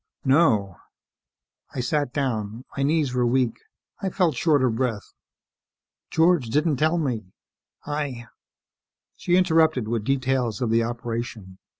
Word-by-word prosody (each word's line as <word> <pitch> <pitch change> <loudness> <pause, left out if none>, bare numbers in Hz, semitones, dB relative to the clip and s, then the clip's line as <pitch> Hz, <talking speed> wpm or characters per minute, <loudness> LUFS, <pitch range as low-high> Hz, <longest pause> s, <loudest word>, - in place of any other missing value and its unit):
"No." 115 - +3 1.0
I - - -3
sat 135 +2 0
down. 115 -4 -3
My 140 - -2
knees 145 -2 +1
were 125 -1 +1
weak. 120 -1 +1 0.4
I 195 - -1
felt 175 -6 +1
short 145 +1 +2
of 120 -3 +1
breath. 115 -4 -2 1.0
"George 160 -5 +3
didn't 150 +5 +1
tell 155 +5 +2
me. 125 - -2 0.6
I 145 -5 -3 0.5
" - - -64
She 175 - +1
interrupted 160 - +3
with 115 -1 -1
details 130 -3 0
of 120 -3 -1
the 115 +1 +3
operation. 115 -4 -5
130 Hz, 130 wpm, -24 LUFS, 115-150 Hz, 1.0 s, No